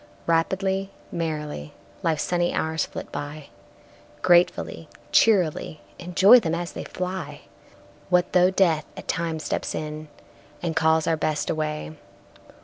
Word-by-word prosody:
Rapidly, 190 Hz, +4 st, 0 dB, 0.2 s
merrily, 150 Hz, -, -4 dB, 0.3 s
Life's 160 Hz, -3 st, 0 dB
sunny 175 Hz, -1 st, 0 dB
hours 160 Hz, 0 st, 0 dB
flit -, -, -8 dB
by, 145 Hz, 0 st, -6 dB, 0.7 s
Gratefully, 175 Hz, -1 st, +2 dB, 0.2 s
cheerily 180 Hz, -7 st, +3 dB, 0.2 s
Enjoy 190 Hz, +7 st, +6 dB
them 165 Hz, -7 st, -1 dB
as 170 Hz, 0 st, -4 dB
they -, -, -7 dB
fly! 185 Hz, +1 st, -5 dB, 0.7 s
What 180 Hz, 0 st, +2 dB
though 180 Hz, 0 st, +5 dB
Death 170 Hz, -5 st, +2 dB
at -, -, -9 dB
times 165 Hz, -2 st, -2 dB
steps -, -, -2 dB
in, 155 Hz, 0 st, -5 dB, 0.5 s
And 165 Hz, -2 st, -3 dB
calls 160 Hz, 0 st, +3 dB
our 165 Hz, -1 st, +1 dB
Best 155 Hz, -1 st, -1 dB
away? 155 Hz, 0 st, -3 dB
165 Hz, 125 wpm, -24 LUFS, 155-180 Hz, 0.7 s, Enjoy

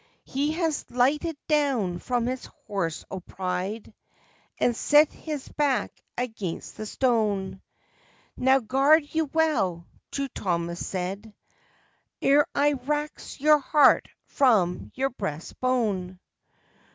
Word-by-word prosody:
He 285 Hz, +3 st, -1 dB
has 325 Hz, -2 st, -1 dB
lighted 285 Hz, +6 st, +1 dB
down 265 Hz, -, +1 dB
from 245 Hz, +2 st, -1 dB
his 255 Hz, +1 st, -3 dB, 0.2 s
horse 170 Hz, -6 st, -3 dB
o' 190 Hz, -, -4 dB
pride, 185 Hz, +4 st, -4 dB, 0.6 s
And 240 Hz, -, +2 dB
set 295 Hz, +5 st, +5 dB
his 300 Hz, -4 st, -6 dB
back 285 Hz, -4 st, 0 dB, 0.3 s
against 220 Hz, -8 st, -4 dB
the 215 Hz, -, -6 dB
stone. 210 Hz, -7 st, 0 dB, 0.7 s
"Now 265 Hz, +1 st, +3 dB
guard 275 Hz, +7 st, +4 dB
you 320 Hz, 0 st, +1 dB
well," 255 Hz, -, 0 dB, 0.2 s
True 275 Hz, 0 st, -2 dB
Thomas 170 Hz, -5 st, -2 dB
said, 195 Hz, +4 st, -4 dB, 0.9 s
"Ere 285 Hz, +2 st, +4 dB
I 290 Hz, +1 st, +3 dB
rax 295 Hz, +4 st, -4 dB
your 300 Hz, +1 st, +5 dB
heart 290 Hz, +1 st, +4 dB, 0.2 s
from 205 Hz, -10 st, +2 dB
your 270 Hz, +1 st, 0 dB
breast 185 Hz, -9 st, -6 dB
bone!" 210 Hz, -8 st, 0 dB
250 Hz, 115 wpm, -26 LUFS, 195-290 Hz, 0.9 s, set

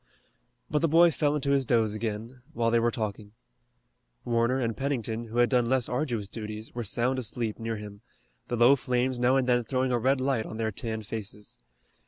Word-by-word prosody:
But 150 Hz, -, 0 dB
the 165 Hz, -, +2 dB
boy 165 Hz, +2 st, +6 dB
fell 145 Hz, +1 st, +1 dB
into 140 Hz, -1 st, 0 dB
his 140 Hz, -1 st, +3 dB
doze 115 Hz, -4 st, +2 dB
again, 110 Hz, +3 st, -5 dB
while 115 Hz, -4 st, +1 dB
they 120 Hz, -, +4 dB
were 120 Hz, +1 st, +2 dB
talking. 105 Hz, -2 st, -5 dB, 0.9 s
Warner 120 Hz, +2 st, +1 dB
and 115 Hz, -3 st, -1 dB
Pennington, 120 Hz, -3 st, -2 dB
who 115 Hz, +1 st, -7 dB
had 120 Hz, 0 st, +5 dB
done 125 Hz, -3 st, +2 dB
less 130 Hz, -2 st, +2 dB
arduous 125 Hz, -6 st, -2 dB
duties, 110 Hz, +1 st, -7 dB
were 120 Hz, -, -3 dB
sound 120 Hz, +5 st, 0 dB
asleep 115 Hz, -2 st, -3 dB
near 115 Hz, 0 st, -3 dB
him, 105 Hz, -1 st, -9 dB, 0.5 s
the 120 Hz, -, -2 dB
low 120 Hz, +4 st, +7 dB
flames 125 Hz, -1 st, -1 dB
now 125 Hz, +2 st, +3 dB
and 130 Hz, -2 st, +2 dB
then 120 Hz, -1 st, +3 dB
throwing 130 Hz, +2 st, 0 dB
a 120 Hz, -, +2 dB
red 130 Hz, +3 st, +2 dB
light 130 Hz, -4 st, 0 dB
on 110 Hz, -, -7 dB
their 110 Hz, -1 st, -1 dB
tanned 110 Hz, +1 st, -5 dB
faces. 105 Hz, -1 st, -7 dB
120 Hz, 200 wpm, -28 LUFS, 110-130 Hz, 0.9 s, low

